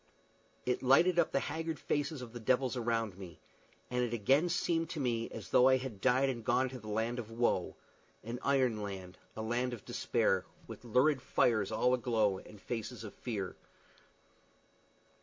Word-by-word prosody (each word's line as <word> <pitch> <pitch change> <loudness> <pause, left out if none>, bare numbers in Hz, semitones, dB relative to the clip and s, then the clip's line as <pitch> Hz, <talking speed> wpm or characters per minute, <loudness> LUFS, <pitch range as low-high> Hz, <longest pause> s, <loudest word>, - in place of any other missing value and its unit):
It 125 - 0
lighted 165 +7 +5
up 170 - +3
the 140 - +1
haggard 160 -1 -3
faces 145 -2 -2
of 120 -2 -10
the 120 - -6
devils 130 +3 +1
around 115 -5 -1
me, 90 -3 -10 0.5
and 125 0 +1
it 120 -1 -2
again 135 - +3
seemed 165 -1 0
to 160 - -4
me 115 -4 -1
as - - -8
though 125 - +6
I 130 0 +6
had 125 -7 -7
died 130 +1 +3
and 120 -4 -3
gone 125 +3 +2
to 130 0 -8
the 110 - -12
land 110 +3 -1
of 115 -2 -6
woe 120 +1 0 0.5
an 115 +3 -5
iron 130 -6 +2
land, 95 -2 -7 0.2
a 110 - -4
land 120 +2 -1
of 115 - -8
despair, - - +1 0.2
with - - -10
lurid 130 +4 +3
fires 110 -5 +2
all 125 +3 +2
aglow 110 -6 +1
and 105 - -14
faces 115 +2 -5
of 105 - -8
fear. 100 -6 -4
120 Hz, 175 wpm, -33 LUFS, 110-130 Hz, 0.5 s, though